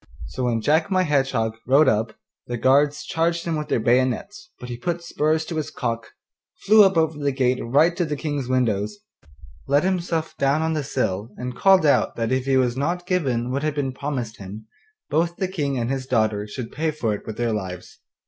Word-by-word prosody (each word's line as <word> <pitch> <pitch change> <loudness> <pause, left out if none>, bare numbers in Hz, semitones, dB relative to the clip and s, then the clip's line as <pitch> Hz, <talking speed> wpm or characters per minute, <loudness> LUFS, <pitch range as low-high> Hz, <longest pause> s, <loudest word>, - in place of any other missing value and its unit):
So 130 - -3
when 115 -2 0
Jack 155 - +2
my 185 -1 +2
Hedgehog 135 -8 +1
rode 140 +3 +5
up 110 -1 +1 0.3
the 120 - -3
guards 140 +4 +3
charged 170 +1 0
him 165 -1 -1
with 150 -1 -3
their - - +1
bayonets, 130 - 0
but 125 - -8
he 120 - -5
put 170 +7 -3
spurs 155 -1 0
to 165 - -5
his 155 - -2
cock, 115 -2 -3 0.6
flew 215 +2 +8
up 190 -3 +3
over 160 -2 +1
the 145 -1 0
gate 130 -1 +1
right 150 +8 +3
to 180 - +1
the 150 -1 -3
King's 145 -3 -3
windows, 115 - 0 0.7
let 140 +3 +3
himself 170 -3 -1
down 140 +3 +2
on 160 0 0
the 155 -2 -1
sill, 110 -6 -2
and 125 0 -5
called 190 -3 +5
out 145 - +3
that 115 0 -2
if 130 0 0
he 135 -1 +3
was 125 -2 +1
not 170 +6 -2
given 130 -10 0
what 135 +2 -1
had 155 -1 -1
been 135 -3 -2
promised 130 -5 -4
him, 100 +3 -9 0.5
both 170 +2 +1
the 190 - -2
King 145 -8 -2
and 120 +1 -1
his 135 -1 -3
daughter 110 -4 +1
should 115 +2 -6
pay 160 +2 -1
for 135 -8 -1
it 105 - -7
with 110 - -6
their 120 -2 0
lives. 95 -4 -6
135 Hz, 210 wpm, -23 LUFS, 120-160 Hz, 0.7 s, flew